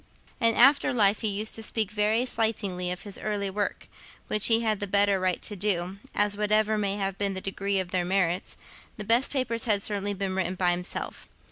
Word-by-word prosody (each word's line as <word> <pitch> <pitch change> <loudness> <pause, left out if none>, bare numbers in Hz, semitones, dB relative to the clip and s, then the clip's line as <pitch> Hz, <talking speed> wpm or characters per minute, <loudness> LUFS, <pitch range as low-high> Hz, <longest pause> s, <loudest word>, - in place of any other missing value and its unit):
In 230 -1 +3
after 275 +4 +5
life 205 -2 +3
he 220 - 0
used 210 +1 -1
to 225 - -1
speak 220 -2 0
very 215 +3 +1
slightingly 205 -7 -1
of 180 0 -4
this 205 -2 -5
early 205 -2 -3
work, 205 +1 -3 0.4
which 210 -1 +2
he 225 0 +4
had 215 -3 0
the 205 - -4
better 200 0 +2
right 185 -1 0
to 205 - -5
do, 190 -1 -1 0.2
as, 205 0 +2
whatever 215 +1 +1
may 200 -2 -1
have 195 -1 -3
been 200 -1 -1
the - - -2
degree 195 +1 -2
of 185 -1 -4
their 180 -1 0
merits, 180 0 -1 0.4
the 210 - -5
best 230 +5 +3
papers 255 -4 0
had 205 -3 +3
certainly 205 -1 -2
been 190 -1 -3
written 185 -1 -2
by 180 -1 +2
himself. 180 +1 -4
205 Hz, 210 wpm, -26 LUFS, 190-215 Hz, 0.4 s, after